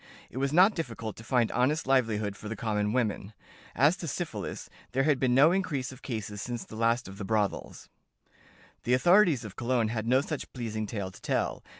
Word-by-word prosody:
It - - -9
was 135 0 0
not 185 +7 +6
difficult 115 - -5
to 110 - -10
find 120 -1 +1
honest 145 +6 +1
livelihood 110 -6 +1
for 105 - -8
the 115 - -3
common 105 -1 -1
women. 110 -4 -1 0.4
As - - +4
to - - -6
syphilis, - - -4 0.3
there 135 +1 +2
had 145 -2 +2
been 125 -2 +2
no 145 +5 +6
increase 150 -9 -1
of 130 0 -13
cases 105 -4 -5
since 120 -1 -5
the - - -11
last 115 +3 +1
of 95 +1 -10
the - - -4
brothels." 105 -1 -2 0.9
The 125 - +2
authorities 175 - +4
of 100 -2 -9
Cologne 120 -2 0
had 110 -1 -3
no 130 +2 +4
such 155 0 -5
pleasing 110 -4 -4
tale 100 -3 -4
to - - -16
tell. - - -1
120 Hz, 200 wpm, -29 LUFS, 110-135 Hz, 0.9 s, not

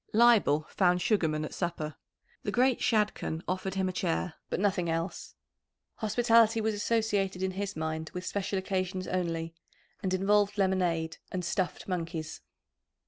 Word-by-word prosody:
Leibel 215 -10 +5
found 180 -2 +3
Sugarman 160 -7 +1
at - - -7
supper. 170 -4 -3 0.5
The - - -3
great 255 0 +3
Shadchan 210 -7 0
offered 185 +1 -2
him 190 -1 +1
a - - -1
chair, 180 -1 -1 0.2
but - - -1
nothing 190 -4 +1
else. 165 +2 -3 0.6
Hospitality 225 0 +4
was 220 0 0
associated 205 -3 0
in 190 - 0
his 200 +1 -4
mind 160 0 -3
with 180 0 -6
special 200 +1 -2
occasions 185 -1 -2
only, 165 -2 -2 0.5
and 190 - -1
involved 205 +2 +2
lemonade 180 -4 +1
and 180 -1 -3
"stuffed 175 +1 -2
monkeys." 165 -3 -4
185 Hz, 140 wpm, -30 LUFS, 170-205 Hz, 0.6 s, Leibel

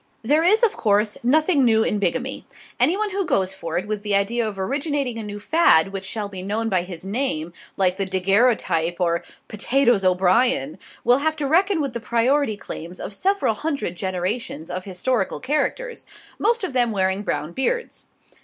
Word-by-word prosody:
There 295 +7 +3
is, 425 +7 +4
of 455 - +3
course, 210 0 +1
nothing 300 +4 +3
new 220 -2 +4
in 210 - 0
bigamy. 250 +8 -2 0.4
Anyone 410 +5 +2
who 395 +1 -1
goes 190 - 0
in 190 - -16
for 165 -1 -3
it 185 - -2
with 210 -1 -3
the 205 -1 0
idea 220 +4 +1
of 205 -2 -6
originating 275 - -2
a - - -5
new 205 0 -6
fad 205 - +3
which 195 -1 -5
shall 210 +1 -3
be 190 -2 -8
known 215 +4 -2
by 185 -3 +2
his 180 0 -8
name, 195 - -2 0.2
like 185 -1 +2
the 195 -1 -1
daguerreotype 190 -3 +2
or 170 -1 +1 0.2
potatoes 240 0 +2
O'Brien, 185 - +2 0.2
will 245 +3 +4
have 315 +2 0
to 300 -2 -3
reckon 360 +5 +2
with 275 -4 -3
the 235 - -3
priority 235 +1 +1
claims 175 -2 -8
of 205 - -6
several 390 - +1
hundred 280 - -3
generations 185 -1 -3
of 185 +1 -5
historical 195 +3 -1
characters, 305 - -2 0.3
most 460 +1 +1
of 370 - -3
them 245 -2 +2
wearing 190 -1 0
brown 150 -6 -3
beards. 475 - -3
220 Hz, 180 wpm, -22 LUFS, 190-275 Hz, 0.4 s, is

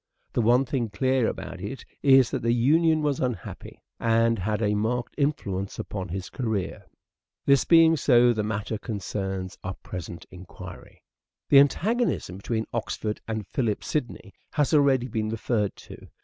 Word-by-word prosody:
The - - +1
one 120 +4 +4
thing 125 -4 -2
clear 130 +4 +1
about 95 - -5
it 105 +7 -6 0.2
is 135 -3 +5
that - - -2
the 115 +1 +2
union 155 +6 +3
was 145 -3 0
unhappy, 125 -9 -5 0.2
and 115 -1 +2
had 105 +3 -1
a 105 -2 +1
marked 115 +4 -1
influence 100 -10 -2
upon 95 -3 -5
his 95 +2 -5
career. 110 -7 -3 0.6
This 140 -3 +4
being 165 -1 +6
so, 125 -4 +4
the 110 - -1
matter 105 0 -3
concerns 95 -4 -4
our 90 +1 -4
present 85 -2 -7
enquiry. 90 0 -11 0.5
The 140 - +8
antagonism 190 - +1
between 110 +2 -2
Oxford 110 -2 -3
and 110 -2 -3
Philip 115 -2 -1
Sidney 120 -7 -4 0.2
has 145 +1 +1
already 135 -4 +4
been 110 -2 -2
referred 110 -2 -1
to. - - -13
115 Hz, 150 wpm, -26 LUFS, 100-135 Hz, 0.6 s, The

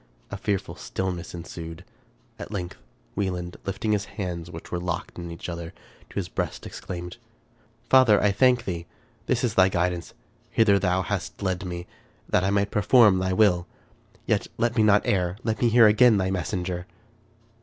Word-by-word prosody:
A - - -3
fearful 100 -3 -2
stillness 90 -2 -4
ensued. 85 0 -8 0.5
At - - -7
length 90 -4 -5 0.4
Wieland, 90 -3 -3
lifting 100 +3 -2
his 105 -1 +1
hands, 85 -4 -4
which 80 -1 -10
were 90 - -1
locked 90 +1 -4
in 85 0 -6
each 85 0 -7
other, 85 -1 -6 0.3
to - - -17
his - - -2
breast, - - -4
exclaimed, 90 0 -7 0.4
" 115 +1 -36
Father! 130 -6 +7
I 105 - +3
thank 125 +3 +3
thee. 85 -3 -4 0.4
This - - +1
is - - +1
thy 95 0 +5
guidance. 90 -1 -2 0.3
Hither 100 -3 +4
thou 95 0 +1
hast - - -4
led 95 0 -1
me, 90 -1 -5 0.4
that 90 - +2
I 95 - +1
might 100 0 +1
perform 105 -2 +5
thy 95 0 0
will. 90 -4 +3 0.6
Yet - - +1
let 120 0 +1
me 110 - +3
not 105 -1 +4
err; 90 -1 0
let 110 -2 -2
me 120 - +4
hear 115 0 +7
again 110 +1 +6
thy 95 -1 0
messenger 90 -1 -3
95 Hz, 175 wpm, -25 LUFS, 90-105 Hz, 0.6 s, Father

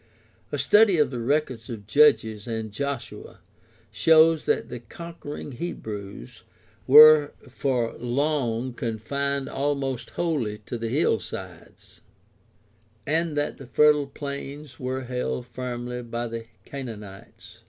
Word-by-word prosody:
A 145 - -2
study 200 +8 +5
of 150 -4 +2
the 125 - -4
records 130 -2 -1
of 110 -4 -7
Judges 110 -4 +3
and 110 -2 -4
Joshua 140 +3 -5 0.5
shows 160 +8 +5
that - - 0
the 120 - -6
conquering 150 +4 -8
Hebrews 105 - -7 0.5
were 150 +1 +9
for 125 -2 -1
long 125 -2 -1
confined 135 +5 -2
almost 135 -3 -2
wholly 140 -12 -2
to 120 - -5
the 115 0 -3
hillsides, 115 - -3 1.0
and 160 0 0
that 145 - -2
the 135 - -10
fertile 150 +3 +4
plains 140 -1 -7
were 130 +1 -3
held 125 0 -3
firmly 125 0 -5
by 120 0 -4
the 115 -1 -6 0.2
Canaanites. 105 -8 -10
130 Hz, 115 wpm, -25 LUFS, 115-145 Hz, 1.0 s, were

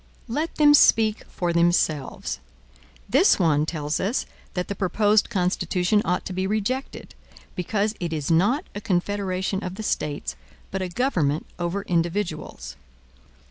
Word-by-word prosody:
Let 300 +8 -2
them 295 -1 +6
speak 220 -6 +5
for 175 -1 -2
themselves. 170 - +1 0.7
This 275 - +5
one 155 -4 +2
tells 150 -2 -2
us 215 +7 0 0.3
that 180 -1 -2
the - - -2
proposed 205 +2 +2
Constitution 185 0 +1
ought 180 +2 -1
to 185 - -5
be 185 +1 -1
rejected, 215 +6 -3 0.4
because 205 +4 0
it 170 -2 -3
is 155 -1 -2
not 210 - +3
a 205 - -6
confederation 190 0 -1
of 180 0 -5
the 220 - -6
States, 150 -7 -2 0.4
but 195 - -2
a 185 - -2
government 175 - 0
over 175 +3 -2
individuals. 170 - -2
185 Hz, 140 wpm, -24 LUFS, 170-210 Hz, 0.7 s, them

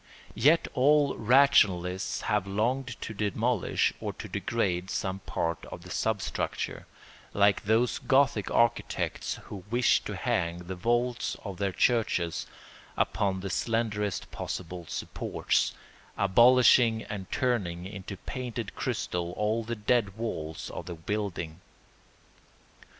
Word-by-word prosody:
Yet 160 +4 +4
all 145 +2 +4
rationalists 100 -7 +3
have 105 -2 0
longed 120 +5 -1
to 110 - -5
demolish 110 +2 0
or - - -4
to - - -8
degrade 95 -5 -1
some 95 0 -2
part 85 -3 -3
of 85 - -9
the 90 - -10
substructure, 105 -1 -2 0.5
like 100 0 +3
those 115 +4 +2
Gothic 135 -6 +2
architects 115 -1 0
who 95 -3 -9
wished 120 +1 +3
to - - -4
hang 85 0 -1
the 90 +1 -6
vaults 120 +6 0
of 100 -3 -5
their 100 0 0
churches 90 -5 +1 0.5
upon 95 0 0
the 95 -1 -4
slenderest 105 -3 -1
possible 90 -1 -5
supports, - - -1 0.5
abolishing 120 +2 +5
and 95 -3 -7
turning 95 -9 -1
into 95 0 -7
painted 120 0 -5
crystal 85 0 -2
all 110 +3 0
the 120 +1 -3
dead 105 -2 +1
walls 80 -9 -4
of - - -7
the 85 - -5
building. 90 -2 -4
105 Hz, 120 wpm, -29 LUFS, 95-120 Hz, 0.5 s, abolishing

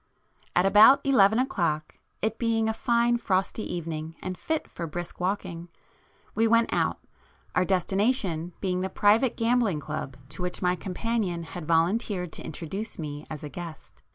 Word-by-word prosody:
At 180 - +4
about 215 +8 +7
eleven 220 -6 +5
o'clock, 170 - -1 0.2
it 220 +1 -1
being 225 -1 +1
a 220 - +1
fine 235 +1 +2
frosty 195 -1 -1
evening 160 -2 -4
and 185 0 -4
fit 315 - -2
for 170 - -6
brisk 175 +2 -6
walking, 180 -2 -3 0.6
we 225 +1 +3
went 230 +1 +3
out, - - +1 0.6
our 180 - +2
destination 190 -2 0
being 185 -2 0
the 190 - -2
private 220 +6 +3
gambling 230 -7 +2
club 150 -4 -5
to 150 +4 -6
which 180 0 -1
my 180 -1 +1
companion 185 -1 -2
had 165 -1 -8
volunteered 180 +2 +1
to - - -7
introduce 190 +8 -5
me 150 -2 -6
as 155 -1 -7
a 150 - -5
guest. 170 0 -9
185 Hz, 155 wpm, -27 LUFS, 170-225 Hz, 0.6 s, about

